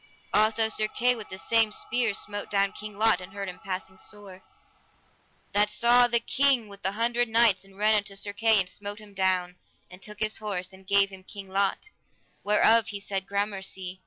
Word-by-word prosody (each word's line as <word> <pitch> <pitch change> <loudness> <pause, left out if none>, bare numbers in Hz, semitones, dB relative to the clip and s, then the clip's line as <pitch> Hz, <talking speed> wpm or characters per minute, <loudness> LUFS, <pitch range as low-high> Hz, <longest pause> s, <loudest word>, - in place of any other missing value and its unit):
Also 220 +1 +4
Sir 215 -1 0
Kay 245 +3 +1
with 220 -3 -8
the 190 - -7
same 225 +2 +2
spear 230 -1 0
smote 205 -1 -4
down 200 -1 +1
King 210 -1 -9
Lot, 220 -2 +3
and 180 +1 -11
hurt 200 -1 -5
him 180 -2 -8
passing 190 0 -6
sore. 200 -3 -9 1.1
That 210 +1 +3
saw 240 +2 +4
the 235 -1 +2
King 260 -1 +2
with 200 0 -13
the 190 +1 -1
Hundred 235 +2 0
Knights, 225 -4 +3
and 195 0 -18
ran 215 +1 +3
unto 200 -1 -3
Sir 200 +1 -3
Kay 220 0 +3
and 190 - 0
smote 205 +2 -6
him 210 -2 -14
down, 185 -2 0 0.3
and 180 +1 -13
took 210 0 -7
his 215 0 +1
horse, 190 -3 -4
and 190 0 -16
gave 200 0 +3
him 190 -1 -11
King 195 0 -9
Lot, 200 - -1 0.5
whereof 220 +2 +4
he 205 -2 -5
said 195 -1 -4
gramercy. 190 -2 -3
205 Hz, 195 wpm, -27 LUFS, 195-220 Hz, 1.1 s, Also